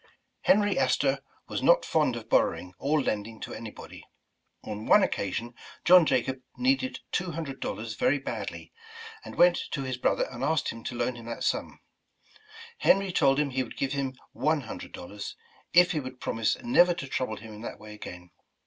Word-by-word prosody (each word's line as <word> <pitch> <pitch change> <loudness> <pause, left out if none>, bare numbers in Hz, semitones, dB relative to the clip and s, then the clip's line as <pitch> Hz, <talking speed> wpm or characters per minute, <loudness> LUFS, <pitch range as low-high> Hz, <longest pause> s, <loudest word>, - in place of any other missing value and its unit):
Henry 205 -1 +3
Astor 135 +1 +2 0.3
was - - -3
not - - +5
fond - - +2
of - - -7
borrowing, 90 0 +1
or 150 +3 +2
lending 110 -4 -2
to - - -6
anybody. 110 -2 -9 0.6
On 105 0 -6
one 205 - +7
occasion 115 - -2 0.3
John 180 -2 +8
Jacob 130 -2 0 0.2
needed 260 +1 +1
two 175 -2 -1
hundred 145 -4 -5
dollars 110 0 -4
very 140 +6 +2
badly, 135 - -6 0.5
and - - -9
w^ent 175 0 +4
to 140 - -3
his 130 -2 -3
brother - - +2
and 125 0 -6
asked 155 +1 +1
him 115 - -7
to 125 - -4
loan 125 +1 -1
him 115 - -10
that 115 - -5
sum. - - -1 1.0
Henry 195 - +4
told 140 -5 +3
him 145 -2 +1
he 130 +1 0
would 125 - -7
give 135 0 -1
him 135 -2 -2 0.2
one 155 -1 +1
hundred 115 - -8
dollars, 100 +3 -7 0.4
if 175 +1 +6
he 155 - 0
w^ould 130 -2 -7
promise 115 -1 0
never 180 -8 +5
to 140 - -5
trouble 130 -4 -2
him 110 0 -10
in 105 - -10
that - - -6
way 110 0 -10
again. 90 -4 -10
135 Hz, 185 wpm, -28 LUFS, 115-160 Hz, 1.0 s, John